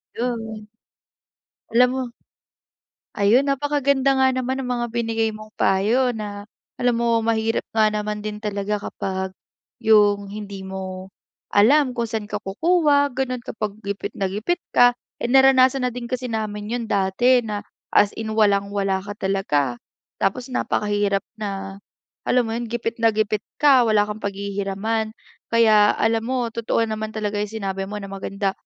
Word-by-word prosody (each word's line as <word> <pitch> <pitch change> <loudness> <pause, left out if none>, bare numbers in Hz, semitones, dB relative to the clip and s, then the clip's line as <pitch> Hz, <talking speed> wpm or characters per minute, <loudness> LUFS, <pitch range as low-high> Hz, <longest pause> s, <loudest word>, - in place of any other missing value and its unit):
'Yon. 225 -3 -4 1.1
Alam 250 +1 +6
mo 260 0 -2 1.1
Ayun, 235 +7 +4
napakaganda 280 -1 +2
nga 265 - +5
naman 260 +1 -1
ang 260 - -4
mga 240 - 0
binigay 225 -1 0
mong 215 0 -12
payo 225 +7 +2
na 205 -2 -6 0.3
alam 245 -1 +1
mo 230 -1 +2
mahirap 225 0 0
nga 220 -1 +4
naman 210 0 -2
din 210 0 -6
talaga 205 0 -1
kapag 190 0 -3 0.5
yung 205 -3 +4
hindi 200 -1 -7
mo 190 -1 -6 0.4
alam 255 +5 +4
kung 235 - 0
san 220 -2 -3
ka 210 0 -5
kukuha 290 - +3
gano'n 255 -1 -1
kapag 215 -3 -5
gipit 200 0 -4
na 195 - 0
gipit 215 - -2 0.2
ka. 245 0 +7 0.3
Eh, 240 - -3
naranasan 265 -1 +5
na - - 0
din 245 0 -6
kasi 255 +1 -3
namin 210 -2 -3
'yon 235 0 -2
dati 205 +6 +3
na 210 -3 -4 0.3
as 205 - +5
in 220 -1 -3
walang-wala 200 -2 +2
ka 205 +1 -7
talaga 145 -11 0 0.4
tapos 245 +7 0
napakahirap 205 -4 0 0.2
na 195 -2 -5 0.5
alam 250 0 +3
mo 225 - -4
'yon 235 +1 -3
gipit 230 0 -3
na 225 - +5
gipit 215 -1 0 0.2
ka 280 -4 +6
wala 215 -1 +4
kang 210 +1 -6
paghihiraman. 200 +2 -2 0.3
Kaya 215 -2 +5
alam 225 0 +1
mo 250 -2 -1
totoo 230 0 0
naman 220 0 -4
talaga 210 -1 -2
yung 210 - -1 0.2
sinabi 195 0 -3
mo 210 - -5
na 195 -1 -7
maganda 195 0 -2
215 Hz, 155 wpm, -22 LUFS, 200-240 Hz, 1.1 s, ka